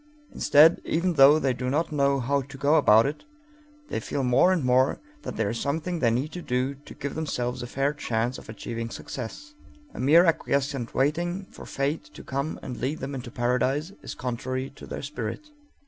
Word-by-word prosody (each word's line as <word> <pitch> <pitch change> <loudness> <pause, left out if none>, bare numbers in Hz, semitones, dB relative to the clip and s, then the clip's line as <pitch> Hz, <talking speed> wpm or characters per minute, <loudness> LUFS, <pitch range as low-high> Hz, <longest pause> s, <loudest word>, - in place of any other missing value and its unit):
Instead, 155 +4 +5
even 175 +2 0
though 145 0 +7
they 135 -4 +1
do 125 +1 -3
not 160 +4 0
know 140 -2 +2
how 140 +3 +1
to 135 +1 -10
go 140 +3 +2
about 115 -8 +6
it, 145 +2 -3 0.7
they - - -2
feel 140 - -3
more 130 +8 +4
and 180 -6 +1
more 130 +1 +3 0.2
that - - -6
there 110 -3 0
is 115 - -4
something 160 +4 -2
they 120 - +3
need 130 +7 -1
to 180 - -6
do 130 -1 -1
to 140 +1 -14
give 140 - -5
themselves 125 -5 -2
a 120 - -5
fair 135 +4 0
chance 120 -3 -2
of - - -15
achieving 115 +1 -5
success. 135 - -7 0.4
A - - -9
mere 160 +7 +6
acquiescent 140 -6 0
waiting 175 +8 0
for - - -11
Fate 140 +3 -2
to - - -10
come 140 +3 -3
and 125 - -6
lead 140 +5 -2
them 140 - -5
into 125 -2 -6
paradise 130 +7 0
is - - -7
contrary 130 +2 -3
to 140 - -12
their - - -6
spirit. 140 - -5
140 Hz, 195 wpm, -26 LUFS, 125-155 Hz, 0.7 s, though